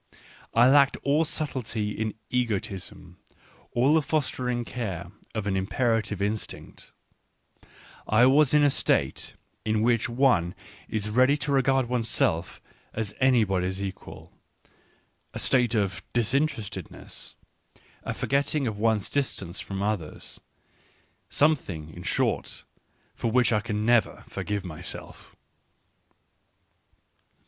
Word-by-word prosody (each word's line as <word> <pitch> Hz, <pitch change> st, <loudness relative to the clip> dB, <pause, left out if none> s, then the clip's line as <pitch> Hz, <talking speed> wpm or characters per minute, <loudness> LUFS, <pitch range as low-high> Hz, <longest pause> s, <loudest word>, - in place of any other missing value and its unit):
I 120 Hz, +2 st, +7 dB
lacked 140 Hz, 0 st, +5 dB
all 150 Hz, +3 st, +3 dB
subtlety 125 Hz, -9 st, -2 dB
in 110 Hz, 0 st, -3 dB, 0.2 s
egoism, 95 Hz, -6 st, -3 dB, 0.5 s
all 130 Hz, +5 st, +3 dB
the 160 Hz, -, +5 dB
fostering 125 Hz, -5 st, -1 dB
care 95 Hz, -9 st, -5 dB, 0.2 s
of 110 Hz, -2 st, -2 dB
an 100 Hz, -2 st, 0 dB
imperative 105 Hz, +1 st, 0 dB
instinct; 105 Hz, +1 st, -5 dB, 1.2 s
I 110 Hz, +3 st, +5 dB
was 140 Hz, +2 st, +5 dB
in 150 Hz, -, +6 dB
a 145 Hz, -, +5 dB
state -, -, 0 dB, 0.3 s
in 110 Hz, 0 st, +1 dB
which 115 Hz, -1 st, +2 dB
one 120 Hz, -9 st, +2 dB, 0.3 s
is 105 Hz, -1 st, -2 dB
ready 130 Hz, +5 st, +4 dB
to 145 Hz, -, -1 dB
regard 135 Hz, -2 st, +3 dB
one's 120 Hz, -2 st, 0 dB
self 85 Hz, -1 st, 0 dB, 0.4 s
as 110 Hz, -2 st, -2 dB
anybody's 95 Hz, -8 st, +2 dB
equal, 95 Hz, -1 st, -7 dB, 1.0 s
a -, -, -2 dB
state 120 Hz, -3 st, +2 dB
of 95 Hz, -6 st, 0 dB
" -, -, -43 dB
disinterestedness," 120 Hz, -1 st, -2 dB, 0.7 s
a -, -, -4 dB
forgetting 140 Hz, +1 st, 0 dB
of 110 Hz, -3 st, -3 dB
one's 110 Hz, -2 st, +2 dB
distance 100 Hz, -11 st, -2 dB
from 95 Hz, 0 st, -4 dB
others 100 Hz, -7 st, -3 dB, 0.4 s
— -, -, -37 dB
something, 90 Hz, -, +1 dB
in 90 Hz, -, -9 dB
short, -, -, -1 dB, 0.5 s
for 115 Hz, -, -2 dB
which 125 Hz, +1 st, +3 dB
I 105 Hz, -, +3 dB
can 105 Hz, -1 st, -2 dB
never 120 Hz, -1 st, +2 dB
forgive 105 Hz, -2 st, -3 dB
myself. 80 Hz, -4 st, -8 dB
115 Hz, 120 wpm, -27 LUFS, 100-130 Hz, 1.2 s, I